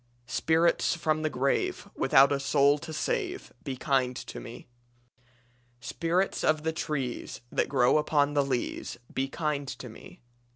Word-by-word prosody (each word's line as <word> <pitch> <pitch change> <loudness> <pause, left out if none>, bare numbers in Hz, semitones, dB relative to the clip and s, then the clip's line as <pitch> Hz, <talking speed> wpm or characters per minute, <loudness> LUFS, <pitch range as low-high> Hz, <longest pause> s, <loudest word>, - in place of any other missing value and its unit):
"Spirits 160 +7 +2
from 155 -2 0
the 155 - 0
grave 135 -1 -1
Without 135 +1 +5
a 140 - +1
soul 140 +1 +3
to 160 +1 -8
save, 380 - -2
Be 135 -5 -4
kind 130 -2 +1
to - - -7
me. 120 -1 -10 1.1
"Spirits 170 +8 -1
of 155 -1 +2
the 160 0 0
trees 135 -8 -3
That - - 0
grow 130 +1 +4
upon 145 -1 +2
the 145 -1 +3
leas, 130 -3 -3 0.2
Be 135 +1 0
kind 145 -1 -2
to 125 - -7
me. 110 - -13
145 Hz, 150 wpm, -28 LUFS, 135-160 Hz, 1.1 s, Without